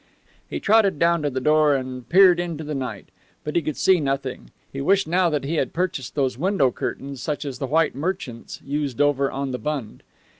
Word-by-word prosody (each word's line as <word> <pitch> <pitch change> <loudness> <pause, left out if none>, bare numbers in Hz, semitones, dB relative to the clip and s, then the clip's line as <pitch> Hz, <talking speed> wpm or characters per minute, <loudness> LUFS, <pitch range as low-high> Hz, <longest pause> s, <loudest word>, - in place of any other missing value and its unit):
He - - -3
trotted 210 -5 +3
down 170 +1 +2
to 145 - 0
the 130 -1 -3
door 150 +1 +4
and 130 -2 -5
peered 185 -1 +6
into 170 -3 -3
the 150 0 -4
night, 125 -8 -5 0.3
but 150 - -5
he 170 - +3
could 155 -1 -4
see 190 -2 +4
nothing. 135 -3 -3 0.2
He 135 - -4
wished 195 +7 +3
now 175 +1 +2
that 150 -3 -1
he 155 +4 -2
had 130 - -1
purchased 165 -8 -3
those 130 -4 0
window 165 -7 +2
curtains 135 +2 -5
such 150 -1 -3
as 135 -3 -5
the 135 - -2
white 160 +3 +2
merchants 140 -6 -5
used 140 -2 -3
over 140 -1 +2
on 135 0 -3
the 125 - -4
Bund. 145 -8 -4
145 Hz, 210 wpm, -23 LUFS, 135-170 Hz, 0.3 s, peered